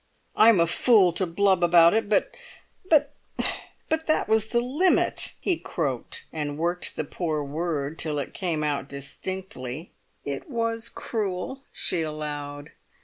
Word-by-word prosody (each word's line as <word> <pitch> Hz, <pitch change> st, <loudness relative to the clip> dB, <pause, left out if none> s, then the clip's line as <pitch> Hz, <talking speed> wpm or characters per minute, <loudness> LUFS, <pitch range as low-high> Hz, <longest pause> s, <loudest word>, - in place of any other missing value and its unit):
"I'm 220 Hz, -3 st, +6 dB
a 170 Hz, -, +5 dB
fool 185 Hz, +2 st, +4 dB
to 180 Hz, +2 st, 0 dB
blub 190 Hz, +1 st, +2 dB
about 170 Hz, 0 st, +6 dB
it—but—but 300 Hz, -, 0 dB, 1.0 s
that 310 Hz, -, +2 dB
was 220 Hz, 0 st, +2 dB
the 235 Hz, -, +1 dB
Limit!" 290 Hz, +10 st, +2 dB
he 360 Hz, -4 st, 0 dB
croaked, 135 Hz, -, -4 dB
and 145 Hz, -2 st, -3 dB
worked 175 Hz, +2 st, -2 dB
the -, -, -1 dB
poor 155 Hz, 0 st, -2 dB
word 150 Hz, 0 st, -3 dB
till 155 Hz, -2 st, -1 dB
it 140 Hz, -, -4 dB
came 170 Hz, -5 st, -2 dB, 0.2 s
distinctly. 140 Hz, +1 st, -6 dB, 0.3 s
"It 140 Hz, -, -5 dB
was 230 Hz, -2 st, -1 dB
cruel," 215 Hz, +4 st, -3 dB
she 175 Hz, -, -1 dB
allowed. 150 Hz, -2 st, -5 dB
175 Hz, 125 wpm, -26 LUFS, 150-220 Hz, 1.0 s, I'm